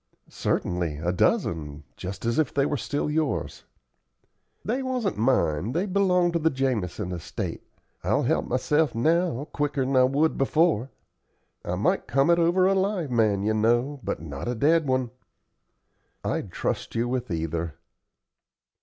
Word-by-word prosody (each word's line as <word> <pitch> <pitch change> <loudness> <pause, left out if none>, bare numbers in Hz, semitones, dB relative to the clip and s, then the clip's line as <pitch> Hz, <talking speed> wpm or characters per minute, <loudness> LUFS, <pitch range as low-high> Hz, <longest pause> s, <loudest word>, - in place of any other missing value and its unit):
"Certainly, 85 -4 -1
a 85 +3 -1
dozen, 75 -4 0
just 95 +4 -6
as 115 +6 +1
if 155 - +1
they 140 -1 +1
were 145 - 0
still 145 +2 -2
yours." 150 -1 -2 1.0
"They 245 +5 0
wasn't 255 -6 -1
mine 110 - +1
they 175 +5 0
belonged 180 -3 +2
to 170 - +1
the 160 0 +3
Jamison 120 - -2
estate. 85 -3 -5 0.4
I'll - - +1
help - - +1
myself 150 +4 +1
now 160 +2 +1
quicker'n 140 -2 0
I 130 0 +6
would 145 +5 +1
before. 140 -3 +2 0.7
I - - -2
might - - 0
come 135 +6 +3
it 170 - +4
over 175 +2 +3
a 195 - +4
live 190 -6 0
man, 110 -4 +2
you 110 +1 +1
know, 120 +6 +1
but - - -3
not 75 0 -6
a 120 - -1
dead 155 +5 +3
one." 130 -2 0 1.1
"I'd - - -2
trust - - -3
you 115 +1 +1
with 125 0 -2
either." 80 -1 -3
130 Hz, 150 wpm, -26 LUFS, 105-160 Hz, 1.1 s, I